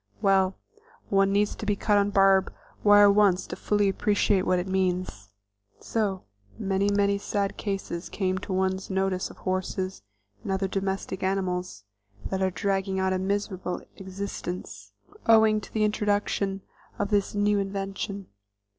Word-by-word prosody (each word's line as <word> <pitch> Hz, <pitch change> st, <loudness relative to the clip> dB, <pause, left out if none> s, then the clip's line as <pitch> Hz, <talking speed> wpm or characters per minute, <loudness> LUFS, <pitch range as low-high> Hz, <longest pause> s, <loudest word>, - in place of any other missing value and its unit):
Well, 190 Hz, -1 st, +3 dB, 0.5 s
one 195 Hz, 0 st, +3 dB
needs 205 Hz, +1 st, +1 dB
to -, -, -9 dB
be 205 Hz, -1 st, +1 dB
cut 205 Hz, +1 st, +2 dB
on 200 Hz, -, +2 dB
a -, -, -1 dB
barb 195 Hz, -1 st, +4 dB, 0.3 s
wire 205 Hz, -1 st, +7 dB
once 200 Hz, -3 st, +3 dB
to -, -, -6 dB
fully 205 Hz, -1 st, +1 dB
appreciate 200 Hz, 0 st, +1 dB
what 185 Hz, -, +3 dB
it 180 Hz, +1 st, -2 dB
means. 185 Hz, -, -1 dB, 0.5 s
So 200 Hz, -5 st, -2 dB, 0.3 s
many, 195 Hz, +1 st, 0 dB
many 200 Hz, 0 st, +2 dB
sad 200 Hz, 0 st, -2 dB
cases 195 Hz, -4 st, -4 dB
come 190 Hz, -2 st, -1 dB
to 190 Hz, -, -7 dB
one's 190 Hz, 0 st, -1 dB
notice 190 Hz, -1 st, -1 dB
of -, -, -13 dB
horses 185 Hz, 0 st, -3 dB, 0.4 s
and -, -, -4 dB
other 190 Hz, 0 st, 0 dB
domestic 190 Hz, -1 st, -3 dB
animals 180 Hz, -, -2 dB, 0.5 s
that 190 Hz, 0 st, -1 dB
are 190 Hz, -, +2 dB
dragging 190 Hz, +2 st, -1 dB
out 190 Hz, 0 st, +1 dB
a 185 Hz, -, 0 dB
miserable 190 Hz, -1 st, -2 dB
existence 180 Hz, -, -6 dB, 0.4 s
owing 220 Hz, -1 st, +5 dB
to -, -, -12 dB
the 215 Hz, -, 0 dB
introduction 205 Hz, -2 st, 0 dB, 0.4 s
of 205 Hz, 0 st, -2 dB
this 205 Hz, 0 st, +1 dB
"new 205 Hz, 0 st, +2 dB
invention." 195 Hz, 0 st, -4 dB
195 Hz, 150 wpm, -26 LUFS, 190-205 Hz, 0.5 s, wire